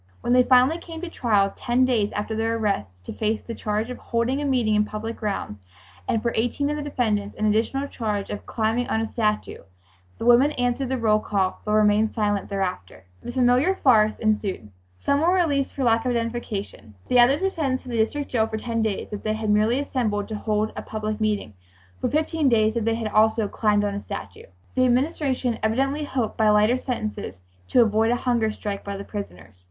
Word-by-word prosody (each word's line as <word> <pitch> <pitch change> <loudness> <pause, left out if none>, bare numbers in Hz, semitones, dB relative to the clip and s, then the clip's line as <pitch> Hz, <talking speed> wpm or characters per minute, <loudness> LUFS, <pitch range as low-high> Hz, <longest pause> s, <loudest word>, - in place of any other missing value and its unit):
When 240 - +1
they 250 - +6
finally 255 +6 +4
came 330 -1 -9
to 355 -2 -6
trial 205 -8 +1
ten 245 +2 +1
days 225 -5 +1
after 210 +2 -3
their 225 +1 0
arrest, 105 - -3
to - - -6
face 220 0 -1
the 230 - -6
charge 215 +2 -2
of 250 - -7
"holding 240 +4 -1
a - - -2
meeting 245 -6 +1
in 210 0 +3
public 215 +2 -5
grounds," 200 - -4 0.5
and 220 - 0
for 235 - 0
eighteen 265 +6 0
of - - -1
the 300 - -4
defendants 220 -8 -1
an 215 - -1
additional 230 +6 +1
charge 210 -6 -3
of 205 - -6
"climbing 225 +2 -1
on 220 - +1
a - - 0
statue," 215 -1 -1 0.6
the - - -5
women 245 +5 +5
answered 245 +1 -1
the 265 - 0
roll 215 -3 +3
call 195 -3 -1
but 210 - -1
remained 215 0 +3
silent 205 -3 -1
thereafter. 185 - -4 0.2
The - - -6
familiar 255 +8 +3
farce 215 - +4
ensued. 205 - -1 0.3
Some 280 - +1
were 350 +3 +3
released 290 -7 +1
for 275 - -2
lack 230 -2 +3
of 255 - -1
identification. 230 - -4
The 250 - +4
others 260 +4 +5
were 385 +1 0
sentenced 270 -7 -2
to 255 - -10
the 235 - -2
District 280 +6 0
Jail—for 220 -2 0
ten 230 0 -2
days 220 -3 -2
if 205 - -4
they 215 - -1
had 220 -1 -1
merely 215 +4 +3
assembled 220 -8 -1
to 215 - -3
hold 215 0 -1
a - - -4
public 215 0 -4
meeting, 210 - -1 0.5
for - - -1
fifteen 310 -1 +1
days 220 -2 +3
if 230 -2 -1
they 225 0 +1
had 225 -2 -3
also 220 0 +3
"climbed 210 0 +1
on 205 -1 -1
a 200 - -4
statue" - - -8 0.3
The 255 - +2
Administration 255 -1 0
evidently 270 +7 0
hoped 250 -6 -2
by 220 -1 +4
lighter 210 +4 +4
sentences 215 - -4 0.3
to 245 - +5
avoid 220 +1 +2
a 240 - +3
hunger 235 -3 0
strike 205 -2 -5
by 200 0 -5
the 200 - -6
prisoners. 200 - -8
225 Hz, 210 wpm, -24 LUFS, 210-250 Hz, 0.6 s, they